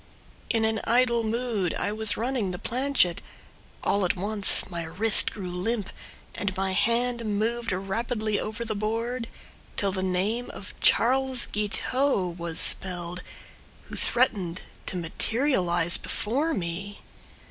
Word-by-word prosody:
In 225 -2 +2
an 220 0 0
idle 235 0 +3
mood 220 -5 -1
I - - 0
was 215 -2 +2
running 235 -3 -1
the 180 - -4
planchette— 240 -7 +1 0.6
All 200 0 +2
at 180 - +2
once 205 +2 +2
my 175 -2 -4
wrist 205 +7 +4
grew 185 -4 -6
limp, 200 +3 -2 0.4
And 200 -1 -3
my 190 0 0
hand 235 +4 +1
moved 225 +2 -1
rapidly 215 +3 -1
over 220 +2 -4
the 220 - -1
board, 230 +3 -2 0.5
'Till 200 -1 +1
the 190 0 -1
name 195 +6 -1
of 195 - -8
"Charles 260 +1 +4
Guiteau" 210 0 0
was 170 -2 -4
spelled, 180 -1 0 0.7
Who - - -6
threatened 200 -8 +1 0.2
to 185 - -1
materialize 175 - +1
before 285 +10 -1
me. 190 +2 -4
215 Hz, 130 wpm, -27 LUFS, 185-235 Hz, 0.7 s, wrist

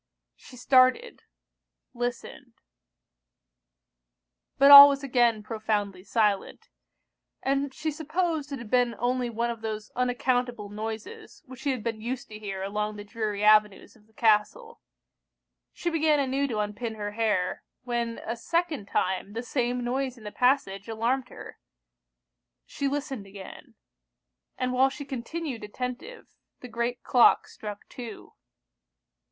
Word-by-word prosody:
She 250 - -15
started 255 - +3 0.7
listened 245 +1 -5 2.0
but 275 0 +7
all 280 0 +13
was 275 0 -2
again 240 -5 +2
profoundly 210 -4 -2
silent; 210 -2 -1 0.7
and 275 +1 0
she 310 +3 -3
supposed 315 0 -2
it 280 - -3
had 235 -4 -10
been 245 -2 +2
only 245 +1 -1
one 235 +1 -1
of 230 -1 -8
those 215 -1 -5
unaccountable 245 -3 -1
noises 220 - -7
which 260 -2 -12
she 285 - -2
had 255 -5 -2
been 225 -2 -3
used 250 +3 -5
to 215 -1 -9
hear 195 -2 -5
along 210 +2 -3
the 205 - -8
dreary 210 -1 -4
avenues 210 0 +3
of 215 -2 -24
the 220 - -30
castle. 225 - +1 0.9
She 345 - -3
began 310 -2 +2
anew 275 +1 0
to 230 -5 -3
unpin 210 +2 -3
her 205 -1 -5
hair, 210 -4 -1 0.2
when 235 -2 -2
a 230 - -3
second 315 - -2
time 190 +2 -1
the 230 +2 -4
same 245 -1 -1
noise 255 +1 -2
in 225 - -15
the 210 - -7
passage 230 -6 +1
alarmed 240 +3 -1
her. - - -11 1.1
She 280 - -3
listened 275 -7 -4
again; 195 -1 -12 0.8
and 255 0 -1
while 260 +1 +4
she 285 +1 -8
continued 270 0 -5
attentive, 250 - -6 0.3
the 250 - -9
great 235 +1 -3
clock 245 -2 +4
struck 210 -1 -9
two. 235 -4 -10
240 Hz, 135 wpm, -27 LUFS, 215-270 Hz, 2.0 s, all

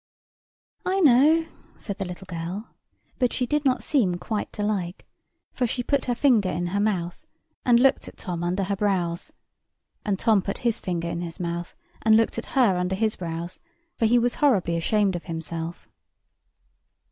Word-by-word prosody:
"I 380 +1 +1
know," 305 +3 +6 0.3
said 200 -2 -6
the 195 - -2
little 180 +2 -8
girl; 180 +4 -5 0.5
but 250 -2 +2
she 250 - 0
did 295 +3 0
not 260 -1 +2
seem 210 -12 +2
quite 205 +5 -3
to 210 - -3
like, 195 -4 -2 0.5
for 250 - 0
she 245 +2 -2
put 280 +2 0
her 245 - 0
finger 235 -8 +3
in 175 0 -2
her 200 - +1
mouth, 185 -5 -1 0.4
and 240 -1 +6
looked 270 +2 +3
at - - -11
Tom 175 -3 -4
under 180 +3 0
her 200 +1 -1
brows; 185 -4 -1 0.7
and 205 -5 0
Tom 215 -1 +3
put 195 - -3
his 235 -1 +2
finger 170 -3 -2
in 170 0 -3
his 170 +1 -6
mouth, 170 0 -4 0.3
and 220 0 +5
looked 225 0 +1
at 235 - -7
her 220 -8 +5
under 180 +1 0
his 215 +2 0
brows, 170 0 -5 0.4
for 225 - +2
he 240 +2 +4
was 240 0 +2
horribly 200 -12 +3
ashamed 195 +3 +1
of 175 - -5
himself. 165 0 -5
200 Hz, 180 wpm, -25 LUFS, 175-240 Hz, 0.7 s, know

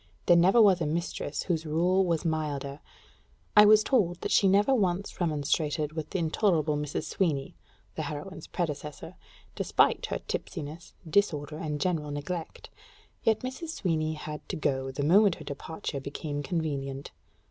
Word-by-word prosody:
There 175 - +6
never 185 +7 +5
was 195 -5 +6
a 155 - +1
mistress 155 -2 -3
whose 165 -3 -1
rule 175 +5 +2
was 170 -3 0
milder. 150 -3 -2 0.8
I 210 - +9
was 215 0 +7
told 190 -10 +1
that - - -3
she 195 - +5
never 205 +7 +4
once 190 -5 0
remonstrated 150 -1 0
with 160 -1 -5
the - - -2
intolerable 160 -2 +1
Mrs. 150 0 -3
Sweeny 150 -8 -1 0.4
[the - - -4
heroine's 170 +6 -6
predecessor], 150 -4 -4 0.4
despite - - +2
her - - -2
tipsiness, 155 +3 -6
disorder, 155 -4 +1
and 150 -2 -3
general 160 -3 -1
neglect; 150 +4 -5 0.5
yet 220 -1 +2
Mrs. 260 +6 -5
Sweeny 160 -4 0
had 150 0 -6
to - - -2
go, 135 -4 -1
the 135 +2 -3
moment 190 +4 +5
her - - -10
departure 140 0 -5
became 145 +1 -4
convenient. 140 -4 -3
160 Hz, 150 wpm, -28 LUFS, 150-185 Hz, 0.8 s, I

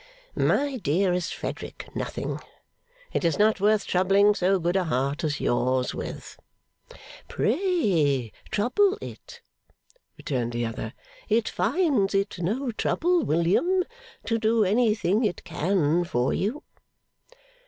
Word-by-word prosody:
'My 280 -2 +1
dearest 180 - 0
Frederick, - - -6
nothing. - - -4 0.7
It - - 0
is 165 -3 +1
not 210 -1 +3
worth 210 0 +3
troubling 195 +3 +4
so 190 0 +2
good 175 +1 -1
a 190 -2 +2
heart 140 -1 -1
as 150 -2 -1
yours 125 +1 +1
with.' - - -7 0.9
'Pray 195 - +1 0.2
trouble 380 - +2
it,' - - -10 0.7
returned 120 -5 -2
the 120 0 -1
other. 115 0 -5 0.3
'It 225 +1 +2
finds 250 - +1
it 195 -2 -1
no 235 +9 -1
trouble, 345 +9 +1
William, 190 - +2 0.4
to 230 0 0
do 220 0 +3
anything 215 0 +2
it 205 -5 -1
can 175 -1 +1
for 125 -6 0
you. 245 +11 -2
195 Hz, 120 wpm, -26 LUFS, 160-230 Hz, 0.9 s, troubling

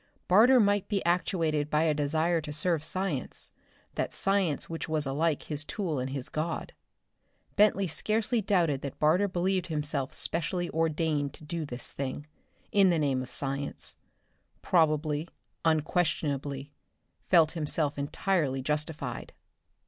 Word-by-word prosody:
Barter 235 +8 +7
might 205 -2 +3
be 200 -2 -1
actuated 165 -4 +1
by 150 +1 +2
a 160 -2 +3
desire 160 +3 +1
to 150 -1 -6
serve 155 +1 +1
science, 165 -4 -3 0.4
that - - -2
science 195 -6 0
which 165 -1 -5
was 155 -2 0
alike 150 +3 0
his 150 -1 -2
tool 165 -4 -2
and 130 +1 -2
his 135 -2 -4
god. 160 +2 -3 0.8
Bentley 205 -1 +4
scarcely 220 +7 0
doubted 170 -9 +2
that 140 - -6
Barter 170 +7 +3
believed 185 0 0
himself 150 -3 -2
specially 175 +2 -1
ordained 155 -3 0
to - - -13
do 160 0 -4
this 120 -2 -6
thing, 140 +1 -4 0.5
in 195 -2 +5
the 170 - +3
name 140 -4 +1
of 130 - -7
science; 140 +1 -3 0.7
probably, 155 -2 +2 0.4
unquestionably, 150 -3 0 0.6
felt 165 -4 +6
himself 150 -2 0
entirely 145 -1 0
justified. 150 +2 -3
155 Hz, 135 wpm, -29 LUFS, 145-180 Hz, 0.8 s, Barter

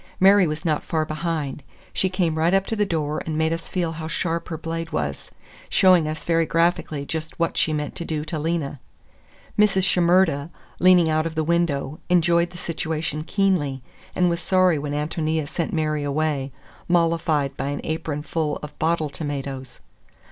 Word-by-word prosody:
Mary 195 -1 +6
was 155 +1 -4
not 155 -3 +1
far 160 -2 -1
behind; 155 -3 -3 0.3
she 190 - +1
came 180 -4 0
right 170 +4 +3
up 195 0 +2
to 225 - -2
the 210 -1 +1
door 155 -4 -1
and 155 -1 -2
made 160 +1 +2
us 165 0 -6
feel 175 -3 -1
how 160 -1 -6
sharp 170 0 -2
her 160 - -3
blade 165 +1 -4
was, 70 -3 -3 0.4
showing 180 -4 +5
us 155 0 -4
very 165 -1 +2
graphically 165 -3 +1
just 160 +1 -5
what 170 - 0
she 160 - +2
meant 150 -1 -3
to - - -4
do 155 -2 -3
to 155 0 -3
Lena. 155 -3 -2 0.8
Mrs. 195 -3 +4
Shimerda, 175 -5 +3 0.3
leaning 180 -2 +6
out 155 0 +1
of 160 - -7
the 160 - +1
window, 155 -4 0
enjoyed 170 0 +3
the 175 - -11
situation 160 -2 -3
keenly, 165 -9 0 0.3
and 180 - +3
was 170 -1 0
sorry 185 -3 +3
when 145 0 -4
Ántonia 155 +1 -1
sent 165 +2 -2
Mary 155 -2 0
away, 145 -1 -1 0.4
mollified 165 -5 +1
by 140 - -3
an 145 0 -3
apronful 155 -1 -2
of 150 0 -9
bottle 160 -1 +1
tomatoes. 140 -3 -5
160 Hz, 175 wpm, -23 LUFS, 150-170 Hz, 0.8 s, Mary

